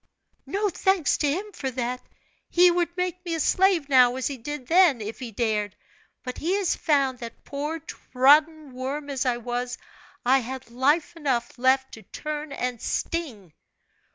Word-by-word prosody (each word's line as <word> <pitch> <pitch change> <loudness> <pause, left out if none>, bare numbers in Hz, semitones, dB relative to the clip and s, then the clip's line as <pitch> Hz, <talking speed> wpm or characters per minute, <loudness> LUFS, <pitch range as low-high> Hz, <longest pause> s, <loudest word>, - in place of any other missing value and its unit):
"No 410 +2 0
thanks 380 -3 +1
to 295 - +2
him 390 +8 -3
for 275 -8 -4
that! 250 0 -3 0.5
He 355 0 +6
would 345 0 -1
make 360 0 -2
me 340 -2 -2
a - - -3
slave 370 -2 +3
now, 250 -3 +5
as 260 - -3
he 280 - -1
did 280 +2 -6
then, 335 -4 +5
if 215 +1 -6
he 250 -3 -6
dared, 210 -2 -1 0.5
but 250 -1 -6
he 350 +5 0
has 400 -3 +1
found 275 -4 +1
that, 235 -2 -9
poor, 295 +3 -3
trodden 300 0 +2
worm 280 +3 -4
as 265 -1 -1
I 245 -1 +1
was, 245 +1 -4 0.5
I 265 +2 +5
had 260 0 -7
life 295 +7 +1
enough 265 -7 -1
left 260 +1 +2
to 220 - -10
turn 300 +7 -6
and 250 -3 -3
sting." 240 - -3
275 Hz, 170 wpm, -25 LUFS, 250-325 Hz, 0.5 s, He